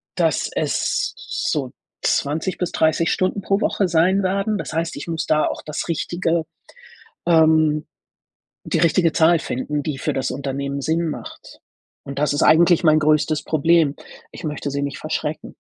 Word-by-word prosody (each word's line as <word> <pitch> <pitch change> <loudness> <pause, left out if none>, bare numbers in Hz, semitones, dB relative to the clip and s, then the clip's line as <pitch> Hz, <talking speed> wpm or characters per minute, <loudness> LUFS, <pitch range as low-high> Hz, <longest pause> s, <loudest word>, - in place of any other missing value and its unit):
dass - - +1
es - - 0
so 150 - -3 0.3
20 160 +6 0
bis 180 - -2
30 160 +1 +2
Stunden 185 +2 0
pro 195 +3 0
Woche 195 - +1
sein 180 +4 +2
werden. 195 +3 0
Das - - -6
heißt, 165 0 -2
ich 145 - -7
muss 165 -1 -2
da 155 -1 +2
auch - - -4
das 150 +2 -4
richtige, 170 0 -1 0.8
ähm 155 -2 +4 0.8
die - - -1
richtige 165 0 +3
Zahl 165 +1 +4
finden, 145 0 -3
die 150 -3 -3
für - - -2
das 130 -1 -1
Unternehmen 140 +1 -4
Sinn 160 +2 0
macht. - - -9 0.5
Und 140 0 -6
das 150 -1 +1
ist 145 - +1
eigentlich 170 +2 +5
mein 155 -1 +5
größtes 155 0 +2
Problem. 160 -1 +2 0.4
Ich 170 - -9
möchte 150 -1 -3
sie 140 0 -2
nicht 140 - -4
verschrecken. - - -4
160 Hz, 160 wpm, -21 LUFS, 150-170 Hz, 0.8 s, eigentlich